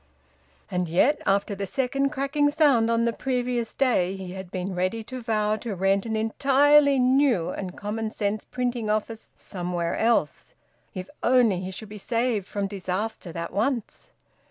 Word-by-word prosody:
And 180 -2 -1
yet, 245 - +3
after 200 +1 +2
the 200 0 -4
second 275 +5 0
cracking 290 +1 +1
sound 285 -7 +3
on 230 0 +2
the 235 - +1
previous 245 -2 -2
day, 195 -9 +2
he 190 -2 -7
had 190 -1 -8
been 185 +1 -4
ready 185 +5 -1
to 255 +3 -7
vow 215 -2 0
to 220 -3 -5
rent 195 +3 +1
an 220 - -2
entirely 280 +5 +4
new 255 - +3
and 185 -2 -6
common 215 +2 -3
sense 210 -1 -2
printing 245 -3 -2
office 215 +1 -2
somewhere 175 -2 -3
else 230 +1 0 0.4
if 185 0 -5
only 235 -6 +4
he 185 - -5
should 200 +3 -8
be 210 0 -9
saved 230 -2 -1
from 200 -1 -2
disaster 195 0 -4
that 170 +1 -5
once! 230 +3 -2
220 Hz, 160 wpm, -25 LUFS, 190-250 Hz, 0.4 s, entirely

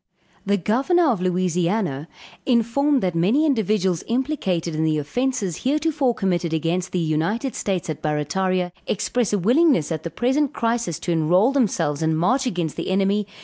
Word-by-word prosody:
_] - - -18
The 200 0 +3
Governor 275 - +2
of 210 -7 -2
Louisiana, 180 -3 0 0.4
informed 255 +3 +2
that 180 -2 0
many 205 - +2
individuals 210 - +1
implicated 230 - -1
in 155 +1 -1
the 155 -1 +1
offences 200 - -2
heretofore 285 -2 0
committed 175 -5 -1
against 170 +3 -1
the - - -2
United 170 - -1
States 190 -4 -2
at 155 -2 -5
Barrataria, 180 +5 -1 0.2
express 215 +2 -1
a 205 - +2
willingness 240 - +3
at 160 -2 -2
the 170 - -5
present 265 - 0
crisis 230 -8 -1
to 175 - -2
enroll 175 - +3
themselves 205 - 0
and 160 0 +1
march 255 - +1
against 175 -9 -3
the - - -3
enemy. 195 +2 +1
190 Hz, 160 wpm, -22 LUFS, 170-245 Hz, 0.4 s, The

